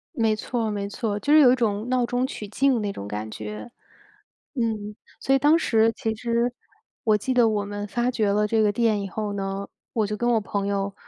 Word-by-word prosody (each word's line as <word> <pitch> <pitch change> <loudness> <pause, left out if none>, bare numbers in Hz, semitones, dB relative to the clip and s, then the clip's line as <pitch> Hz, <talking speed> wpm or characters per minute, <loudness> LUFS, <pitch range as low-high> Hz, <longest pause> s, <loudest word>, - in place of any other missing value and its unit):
没 225 -2 +2
错， 225 0 -2
没 200 -1 -3
错， 205 0 -3
就 290 +8 +1
是 310 - +8
有 255 -4 +7
一 - - +4
种 220 -1 -1
闹 250 -1 +2
中 245 +1 0
取 210 - -7
静 255 +3 +2
那 200 -1 -2
种 100 - -7
感 105 +1 -5
觉。 105 - -7 0.8
嗯， 215 -4 -2 0.2
所 270 - +1
以 - - +3
当 300 +4 +5
时 225 -7 +3
其 220 -1 -2
实 235 +1 0 0.5
我 215 -2 +4
记 260 +5 -2
得 240 -3 +4
我 205 -2 -1
们 205 0 -5
发 240 +4 0
掘 215 -4 +1
了 210 +1 +2
这 220 +1 +2
个 210 -1 +3
店 215 -2 +1
以 195 - -5
后 210 +2 -3
呢， 195 0 -3 0.3
我 220 -2 +1
就 210 +1 -3
跟 240 +2 0
我 225 - +3
朋 200 0 -3
友 200 0 -1
215 Hz, 240 characters per minute, -24 LUFS, 205-240 Hz, 0.8 s, 是